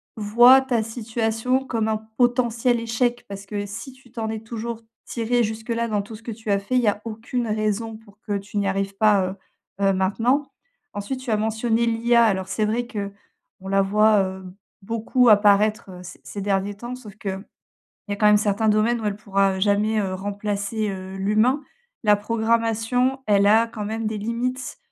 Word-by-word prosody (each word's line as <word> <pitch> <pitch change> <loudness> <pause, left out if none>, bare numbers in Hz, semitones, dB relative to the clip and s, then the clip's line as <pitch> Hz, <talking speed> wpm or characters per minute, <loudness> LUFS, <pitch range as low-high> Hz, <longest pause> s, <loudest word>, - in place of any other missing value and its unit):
voient 240 +5 +6
ta 255 -4 0
situation 225 +2 -1
comme 230 -5 -1
un 220 - +1 0.2
potentiel 245 -1 +2
échec, 240 +1 -1
parce 200 0 -8
que 205 0 -4
si 230 +6 -8
tu 255 -2 -21
t'en 225 -2 -4
es 220 0 -3
toujours 225 +1 -6 0.2
tiré 240 +1 0
jusque-là, 225 +2 -2
dans 210 -2 0
tout 210 +2 -10
ce 220 - -14
que 230 - -5
tu 220 0 -8
as 200 - +3
fait, 200 +6 -6
il 250 - +4
y 235 - 0
a 205 0 +1
aucune 230 +2 -3
raison 215 +1 -2
pour 210 -2 -20
que 205 - -3
tu 205 +1 -8
n'y 200 -1 +1
arrives 195 0 -2
pas, 210 -2 +4
heu, 185 - -5 0.5
heu, 195 - +4
maintenant. 230 +9 +1 0.4
Ensuite 205 +6 -4
tu 255 - -7
as 215 - +2
mentionné 225 +2 0
l'IA. 235 +1 +3
Alors 190 -4 +1
c'est 215 +2 -1
vrai 235 +3 -1
qu'on 200 -3 -9
la 195 0 +3
voit, 210 +1 +4
heu, 190 0 -5 0.4
beaucoup 230 +4 +2
apparaître, 210 0 +4
heu, 180 -1 -10
c 180 0 -11
ces 200 - -7
derniers 195 0 0
temps, 240 +4 -7
sauf 215 -6 -12
qu'il 195 -2 -5 0.7
y - - -2
a - - -2
quand 210 - +2
même 210 0 +6
certains 210 +1 +1
domaines 215 +3 +2
où - - -5
elle 205 -1 -1
pourra, 195 -2 +1
heu, - - -5
jamais, 210 +2 +2
heu, 190 -2 -2
remplacer, 205 +2 -3
heu, 190 0 -7
l'humain. 215 +8 +2 0.4
La 210 -2 +5
programmation, 230 +4 0
elle 200 -1 +4
a 220 +3 +5
quand 220 -2 -6
même 220 +1 -3
des 215 0 -2
limites, 240 +4 -3
215 Hz, 195 wpm, -23 LUFS, 205-235 Hz, 0.7 s, voient